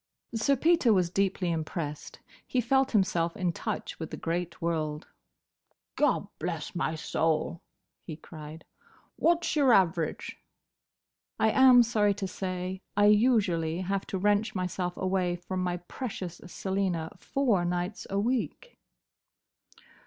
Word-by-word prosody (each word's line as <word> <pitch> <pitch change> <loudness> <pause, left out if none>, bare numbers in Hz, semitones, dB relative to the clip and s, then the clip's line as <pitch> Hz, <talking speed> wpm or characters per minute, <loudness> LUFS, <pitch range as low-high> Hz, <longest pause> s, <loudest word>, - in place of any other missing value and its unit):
'" - - -40
Sir 230 +5 +2
Peter 315 -3 +3
was 180 -4 +2
deeply 195 -2 0
impressed. 155 -2 -4 0.3
He 255 - 0
felt 265 +3 +2
himself 175 -5 +1
in 180 -2 0
touch - - -4
with 160 - -5
the - - -6
great 170 +1 -3
world. 155 -2 -2 0.9
"Gobblessmysoul!" 165 - -1 0.4
he 160 - -7
cried. 155 0 -11 0.5
"What's 340 0 +2
your 280 -4 +4
average?" 170 -5 +1 1.0
"I 220 - +4
am 255 -1 +7
sorry 210 -3 +2
to 195 -1 -3
say, 185 0 -4 0.2
I 205 - +5
usually 185 -8 +2
have 195 +1 -2
to 190 - -3
wrench 205 +3 +1
myself 180 -1 -2
away 185 -2 0
from 185 +1 -4
my 180 -1 -1
precious 180 -1 -6
Selina 185 -3 -2
four 240 -10 +1
nights 175 +3 -3
a 195 - -1
week." 255 - -2
185 Hz, 125 wpm, -29 LUFS, 170-215 Hz, 1.0 s, am